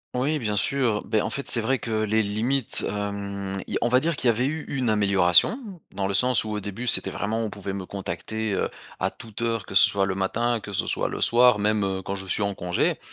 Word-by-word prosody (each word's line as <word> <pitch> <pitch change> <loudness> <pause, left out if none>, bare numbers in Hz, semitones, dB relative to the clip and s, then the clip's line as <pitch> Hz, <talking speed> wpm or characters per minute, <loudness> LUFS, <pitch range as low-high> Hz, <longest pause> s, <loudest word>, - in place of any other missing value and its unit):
Oui 140 +5 0
bien 105 -5 -2
sûr. 115 -2 +1
Beh, 110 - +1
en - - -3
fait 140 - -3
c'est 120 - +10
vrai 130 +4 0
que - - -7
les 110 +1 +1
limites 110 +5 0
hem, 100 -1 -4
i - - -3
on 120 - +2
va 125 +1 +4
dire 165 +3 -1
qu'il 130 - -1
y - - +6
avait 115 +3 +1
eu 155 +2 -3
une 130 -5 -1
amélioration 100 - +3 0.3
dans 95 - -3
le 100 - -2
sens 125 +5 +2
où 110 - -6
au 105 - -3
début, 105 +5 -6
c'était - - +5
vraiment, 110 +2 -3
on 110 - -3
pouvait 100 -1 -6
me 95 -2 -6
contacter, 100 +3 -4
heu, - - -1 0.3
à - - 0
toute 110 0 -11
heure, 115 -4 -2
que - - -10
ce 95 - +6
soit 100 -1 0
le 95 - -2
matin, 115 +5 -1
que 100 0 -10
ce 100 - -1
soit - - +1
le - - -6
soir 120 -1 +4
même 105 0 0
heu, 95 -1 -2
quand 100 - -4
je 95 -1 -4
suis 100 +2 0
en 100 0 -1
congé. 90 -1 -1
105 Hz, 250 wpm, -24 LUFS, 100-120 Hz, 0.3 s, c'est